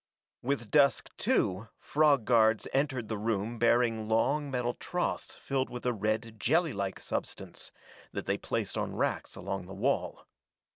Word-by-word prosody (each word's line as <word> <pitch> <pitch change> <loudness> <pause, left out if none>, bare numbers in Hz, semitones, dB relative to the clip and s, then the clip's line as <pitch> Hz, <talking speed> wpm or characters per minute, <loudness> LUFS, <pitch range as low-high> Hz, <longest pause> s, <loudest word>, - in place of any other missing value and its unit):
With 125 -4 -2
dusk, 140 -2 +4
too, 95 +5 +1
frog 145 -5 +3
guards 110 -3 +4
entered 135 -4 0
the 110 -2 -3
room 110 +1 -1
bearing 115 -2 +3
long 140 +6 +2
metal 125 -2 -1
troughs 180 +7 -3
filled 135 -1 -1
with 125 0 -7
a 125 - +2
red 110 +1 -2
jellylike 110 - +1
substance, - - -5 0.4
that - - -4
they - - 0
placed - - -2
on - - -3
racks - - -1
along 95 -2 -4
the 95 - -8
wall. 130 +8 -1
120 Hz, 145 wpm, -30 LUFS, 110-135 Hz, 0.4 s, dusk